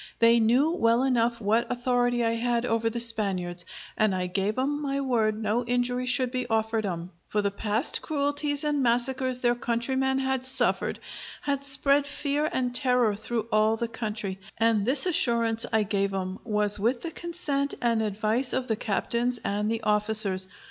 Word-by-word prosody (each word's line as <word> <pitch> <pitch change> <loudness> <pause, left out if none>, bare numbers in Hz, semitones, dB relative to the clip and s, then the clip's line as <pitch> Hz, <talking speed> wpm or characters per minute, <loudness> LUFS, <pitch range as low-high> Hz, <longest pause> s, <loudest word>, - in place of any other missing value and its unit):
They 230 0 +5
knew 245 +8 +3
well 235 -6 +2
enough 240 -3 +1
what 220 +2 0
authority 245 -1 +1
I 230 - +2
had 235 +1 0
over 230 -1 0
the 235 +1 -4
Spaniards, 190 -7 +1 0.3
and 215 -3 +2
I 180 -1 -1
gave 195 +4 -1
'em 290 +3 -1
my 275 -1 -2
word 225 -5 0
no 220 +3 0
injury 245 +1 -1
should 250 0 +1
be 255 -1 -3
offered 220 -1 0
'em: 175 -1 -5 0.2
for 210 -1 -1
the 200 - 0
past 210 +3 +1
cruelties 290 0 -1
and 295 -2 0
massacres 255 +1 +1
their 240 -1 +3
countrymen 260 +3 -1
had 265 -1 -1
suffered, 260 +1 -1 0.4
had 280 -1 -1
spread 280 +1 +3
fear 290 +1 -1
and 250 -1 -1
terror 250 -4 +2
through 220 +1 -3
all 215 +1 +3
the 235 - -2
country; 210 -4 -5 0.2
and 225 -3 +2
this 265 +4 +4
assurance 235 -8 +1
I 220 -1 +2
gave 200 -1 -1
'em 185 0 -4
was 210 -2 +2
with 235 +4 0
the 335 - -4
consent 305 -5 -3
and 230 -2 +1
advice 220 +4 -1
of 255 -1 -1
the 220 - 0
captains 235 +3 -1
and 210 +1 -1
the 225 -1 -2
officers. 210 -3 +1
235 Hz, 175 wpm, -26 LUFS, 215-260 Hz, 0.4 s, They